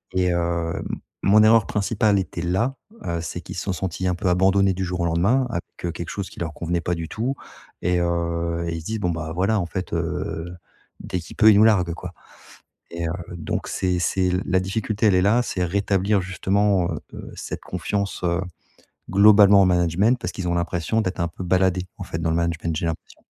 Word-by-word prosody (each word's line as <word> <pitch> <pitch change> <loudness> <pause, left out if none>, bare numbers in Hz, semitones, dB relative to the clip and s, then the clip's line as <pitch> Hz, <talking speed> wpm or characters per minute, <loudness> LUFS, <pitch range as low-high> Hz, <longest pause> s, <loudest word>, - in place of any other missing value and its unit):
et 90 -1 +2
heu, 85 -1 -1 0.4
mon 105 +2 +6
erreur 110 0 +5
principale 105 -1 +1
était 90 -2 -4
là. 95 +10 0 0.3
Heu, 85 0 -2
c'est 85 +1 -5
qu'ils 90 - -9
se 90 - -3
sont 95 - -2
sentis 95 +1 -3
un 90 - +1
peu 90 - -3
abandonnés 95 +2 +3
du 95 +1 -3
jour 90 0 -3
au - - +1
lendemain 100 +11 +2
avec, 85 -7 -3 0.2
heu, 85 - -1
quelque 85 0 -6
chose 100 -2 -4
qui - - -13
leur 80 -2 -3
convenait 85 +2 -2
pas 90 0 -1
du 85 -1 -5
tout 125 +5 -2 0.5
et 90 0 +1
heu, 85 0 -1
et 85 - -2
ils 80 - -5
se - - -14
disent: 110 +3 -3
«Bon, 90 - 0
ben, 80 -1 -4
voilà, 100 +5 +1
en 90 - -1
fait, 90 +2 -5
heu, 80 +1 -3 0.5
dès 90 - -3
qu'il 85 - -11
peut, 110 0 +7
il 100 - +5
nous 105 - +6
largue, 90 -6 +3
quoi» 90 +1 -8 0.8
et 85 0 -4
heu, - - -2 0.3
donc 80 -2 -3
c'est 90 -1 -1
c'est 90 +1 +1
la 95 0 +2
difficulté, 105 +3 -2
elle 100 - +4
est 90 - +4
là. 105 +6 +4
C'est 90 -6 -2
rétablir, 100 +2 +1
justement, 95 0 +1
heu, - - -3
heu, - - -9
cette - - -6
confiance, 95 +3 -3
heu, 85 +1 +1 0.7
globalement 100 0 +7
en - - +5
management, 90 +6 +2
parce 90 - -4
qu'ils 95 -2 -4
ont 85 - 0
l'impression 85 +5 0
d'être 95 -3 -3
un 85 - +1
peu 90 - -8
baladés 90 0 +1
en 100 - -6
fait, 80 - -5
dans 80 0 0
le 80 - +1
management, 85 -1 -1
j'ai 85 +2 -2
l'impression. 80 - -6
90 Hz, 220 wpm, -23 LUFS, 85-100 Hz, 0.8 s, peut